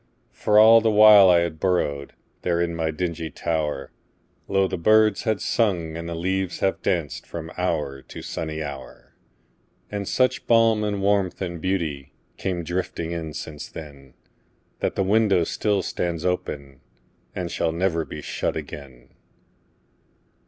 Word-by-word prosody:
For 105 - +1
all 115 +1 +8
the 110 - +2
while 105 -2 +8
I 85 -1 +5
had 85 -2 -3
burrowedThere 85 0 -2
in 85 -1 -3
my 80 -1 -1
dingy 80 0 -3
tower, 75 -2 -3 0.6
Lo! 95 0 +2
the - - -3
birds 110 +2 +4
had 110 -3 +1
sung 90 -8 0
and 85 0 -5
the 85 - -4
leaves 95 +2 -2
had 95 - -1
dancedFrom 80 -1 -3
hour 75 -6 -2
to - - -10
sunny 80 -1 -4
hour. 70 -3 -9 0.8
And 100 -2 -4
such 130 0 +1
balm 115 -2 +4
and 100 -2 -2
warmth 100 -2 +1
and 85 -3 -4
beautyCame 85 0 -4
drifting 85 -1 -3
in 80 -2 -5
since 75 -2 -7
then, 70 -4 -11 0.6
That - - -1
the 95 - +1
window 100 -2 +3
still 100 +3 0
stands 85 -1 -3
openAnd 70 -7 -3 0.7
shall 80 - 0
never 85 -1 0
be 75 -1 -8
shut - - -2
again. 70 -4 -9
85 Hz, 140 wpm, -24 LUFS, 80-100 Hz, 0.8 s, all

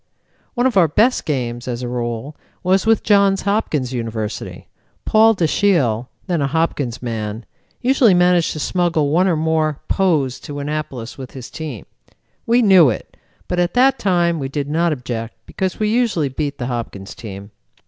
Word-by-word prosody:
"One 245 0 +1
of 250 -6 +2
our 175 -3 +6
best 225 - +2
games, 120 -5 -3
as 125 0 -3
a - - -3
rule, 120 +3 -4 0.3
was 190 +3 +2
with 225 -1 +3
Johns 200 -2 +3
Hopkins 160 - -1
University. 115 -3 -5 0.4
Paul 220 +1 +5
Dashiell, 155 - +1 0.2
then 175 -5 -1
a 140 - +1
Hopkins 140 -5 -1
man, 110 -1 -4 0.4
usually 250 -6 +4
managed 180 -1 +3
to 155 - -6
smuggle 165 -3 0
one 180 +5 +3
or 175 - +2
more 155 -1 0
Poes 155 -9 +1
to 145 - -8
Annapolis 140 -5 -5
with 130 -2 -8
his 130 -2 -9
team. 150 -9 -7 0.6
We 240 +1 +4
knew 185 - +7
it, 110 - -5 0.3
but 180 - -1
at 175 +4 0
that 265 +2 +4
time 175 -4 +1
we 135 -1 -3
did 140 0 -3
not 165 +3 +1
object 120 -5 -4
because 190 -1 -3
we 215 -1 +1
usually 220 - +1
beat 145 +2 -3
the 120 - -4
Hopkins 115 -6 -5
team. 100 -2 -9
155 Hz, 170 wpm, -19 LUFS, 125-190 Hz, 0.6 s, knew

